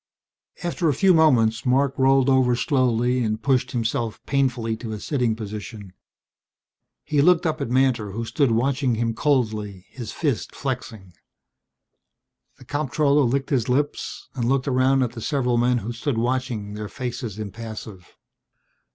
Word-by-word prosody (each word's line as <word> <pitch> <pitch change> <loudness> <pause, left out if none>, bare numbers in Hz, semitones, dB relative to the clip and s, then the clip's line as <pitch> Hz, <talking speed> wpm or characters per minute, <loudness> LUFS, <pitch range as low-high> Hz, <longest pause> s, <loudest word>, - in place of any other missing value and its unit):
After 175 -1 0
a 145 - +1
few 195 -2 +4
moments 120 -9 +3
Marc 135 +1 +2
rolled 135 0 +3
over 130 -2 +4
slowly 125 -1 +1
and 110 -1 -1
pushed 130 0 +1
himself 115 -2 -2
painfully 125 -5 0
to 110 -1 -6
a 105 - -5
sitting 125 -3 0
position. 105 -2 -8 1.1
He 150 -2 +1
looked 175 +2 +4
up 155 -2 -1
at 140 - -2
Mantor 125 -4 +2
who 115 +2 -3
stood 140 +3 +1
watching 125 +2 +1
him 115 0 -1
coldly, 110 -8 -1
his 120 -5 -7
fist 145 -8 -2
flexing. 115 -8 -5 1.4
The 130 - -16
comptroller 145 +1 +1
licked 135 +4 -1
his 125 -3 +1
lips 145 +3 -2
and 120 -3 -1
looked 135 +1 +1
around 130 0 +3
at 120 - -2
the 120 -2 -8
several 125 -2 0
men 125 +1 +2
who 115 0 -4
stood 120 +2 -2
watching, 120 -3 -2
their 105 0 -6
faces 120 -5 -5
impassive. 110 -3 -8
125 Hz, 150 wpm, -23 LUFS, 115-135 Hz, 1.4 s, few